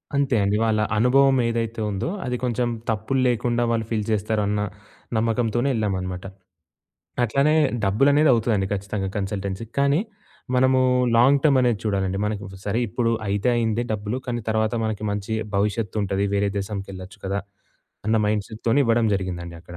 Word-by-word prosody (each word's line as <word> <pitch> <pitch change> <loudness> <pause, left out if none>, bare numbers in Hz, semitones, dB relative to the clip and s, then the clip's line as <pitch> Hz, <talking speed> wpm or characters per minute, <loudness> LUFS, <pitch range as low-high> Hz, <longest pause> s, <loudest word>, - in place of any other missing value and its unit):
అంతే 140 -3 +2
అండి. 100 +1 +1
వాళ్ళ 110 -1 +2 0.2
అనుభవం 135 +4 +4
ఏదైతే 115 -1 -2
ఉందో, 100 - -2 0.2
అది 125 - -1
కొంచెం 120 0 0 0.2
తప్పుల్లేకుండా 120 +1 +1
వాళ్ళు 115 -1 0
ఫీల్ 110 -2 -1
జేస్తారు 110 0 0
అన్న 105 0 0 0.6
నమ్మకంతోనే 115 +3 +1
ఎళ్ళామనమాట. 95 -4 -2 1.0
అట్లానే 140 +7 +2 0.3
డబ్బులనేదవుతుందండి 115 -2 +3
ఖచ్చితంగా 100 0 -3
కన్సల్టెన్సీ‌కి. 100 +2 -4
కానీ, 140 +3 +3 0.5
మనము 130 +1 +4 0.4
లాంగ్ 135 +4 +5
టర్మ్ 145 -4 +4
అనేది 120 -4 +2
చూడాలండి. 95 -2 0
మనకు 105 -1 -3 0.2
సరే 105 +3 0
ఇప్పుడు 115 +2 0 0.2
అయితే 100 +4 0
అయింది 115 0 0
డబ్బులు. 105 +2 -3
కానీ, 120 -1 -2
తర్వాత 110 +1 +1
మనకి 110 -1 -3
మంచి 100 +2 -3 0.2
భవిష్యత్తుంటది. 100 -1 0
వేరే 100 0 +1
దేశంకెళ్ళొచ్చు 95 -1 -6
కదా! 100 +1 -1 0.7
అన్న 110 +1 +3
మైండ్‌సెట్‌తోనే 110 +5 0
ఇవ్వడం 115 0 +3
జరిగిందండి 85 -3 -4
అక్కడ. 85 +1 -11
110 Hz, 135 wpm, -23 LUFS, 100-120 Hz, 1.0 s, లాంగ్